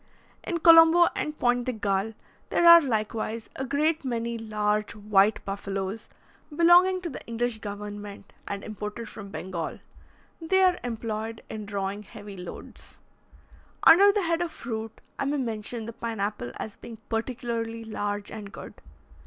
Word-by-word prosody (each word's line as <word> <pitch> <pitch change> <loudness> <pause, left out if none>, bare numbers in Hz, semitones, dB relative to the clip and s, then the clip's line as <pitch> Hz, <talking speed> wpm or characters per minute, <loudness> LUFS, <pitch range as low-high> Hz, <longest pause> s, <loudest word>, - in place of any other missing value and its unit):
In 345 - -2
Colombo 330 +1 +8
and 300 0 -3
Pointe 245 0 +1
de 255 - -1
Galle 210 0 -1 0.3
there 345 - +2
are 340 0 +11
likewise 220 -3 -2
a 265 - -3
great 295 +4 0
many 235 -2 -2
large 215 -1 -1
white 210 0 +2
buffaloes, 195 +1 -4 0.5
belonging 355 +3 +5
to 350 - -4
the - - -8
English 235 0 -2
government, 205 -1 -8
and 200 0 -4
imported 215 +2 -6
from 205 -2 -9
Bengal. 180 -4 -5 0.6
They 380 +4 +3
are 365 -1 +4
employed 225 -1 -4
in 215 -1 -6
drawing 200 0 -3
heavy 205 -1 -10
loads. 180 -1 -10 0.9
Under 400 +4 +8
the 405 -1 0
head 335 0 +1
of 345 -2 -2
fruit, 225 -4 -6 0.2
I - - 0
may 290 +2 0
mention 230 -2 -3
the 230 - -7
pine 230 -1 -5
apple 200 - -2
as 215 - -7
being 230 - -10
particularly 230 -1 -3
large 205 -2 -3
and 210 -2 -8
good. - - -9
225 Hz, 150 wpm, -27 LUFS, 210-265 Hz, 0.9 s, are